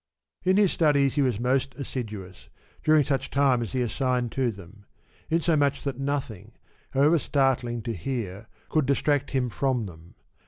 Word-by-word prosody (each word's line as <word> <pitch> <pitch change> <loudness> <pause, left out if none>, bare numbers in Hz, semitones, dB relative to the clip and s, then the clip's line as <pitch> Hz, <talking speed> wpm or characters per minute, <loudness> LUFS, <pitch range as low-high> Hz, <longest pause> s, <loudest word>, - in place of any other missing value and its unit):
In 185 +1 +3
his 205 -3 +4
studies 140 -4 +3
he 145 - +1
was 125 -6 +1
most 130 +1 0
assiduous, 105 -9 -7 0.3
during 155 -1 +5
such 135 -1 -1
time 135 -3 +3
as 115 - -5
he 130 -1 +1
assigned 125 0 -1
to 130 -3 0
them; 100 0 -14 0.4
in 165 +1 +2
so 165 0 +2
much 140 -2 +1
that 135 -2 -3
nothing, 125 -7 -3 0.4
however 150 +5 +3
startling 130 -4 0
to 115 - -3
hear, 110 0 -4 0.2
could 155 -4 +1
distract 145 0 +1
him 130 -2 0
from 125 -1 -1
them. 85 -2 -12
130 Hz, 165 wpm, -26 LUFS, 115-140 Hz, 0.4 s, during